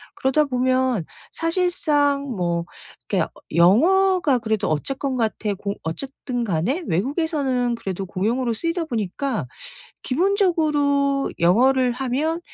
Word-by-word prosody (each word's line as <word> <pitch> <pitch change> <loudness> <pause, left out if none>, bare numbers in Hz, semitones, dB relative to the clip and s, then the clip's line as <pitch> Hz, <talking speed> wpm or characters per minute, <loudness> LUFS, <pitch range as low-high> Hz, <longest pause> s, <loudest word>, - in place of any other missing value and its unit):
그러다 270 +3 +2
보면 255 - +1 0.3
사실상 310 -5 +1
뭐 170 -2 -1 0.4
이렇게 - - +1
어 - - -6 0.3
영어가 315 - +4
그래도 220 -3 -1
어쨌건 265 - -2
같애 220 -3 -1
고 200 +1 -4
어쨌든 245 +7 -4
간에 225 - -1
외국에서는 260 - 0
그래도 195 -4 -5
공용어로 225 +6 -1
쓰이다 335 +7 -2
보니까 240 - -3 0.6
기본적으로 295 -5 +1
영어를 250 +8 +3
하면 275 +6 -1
260 Hz, 280 characters per minute, -22 LUFS, 215-300 Hz, 0.6 s, 영어가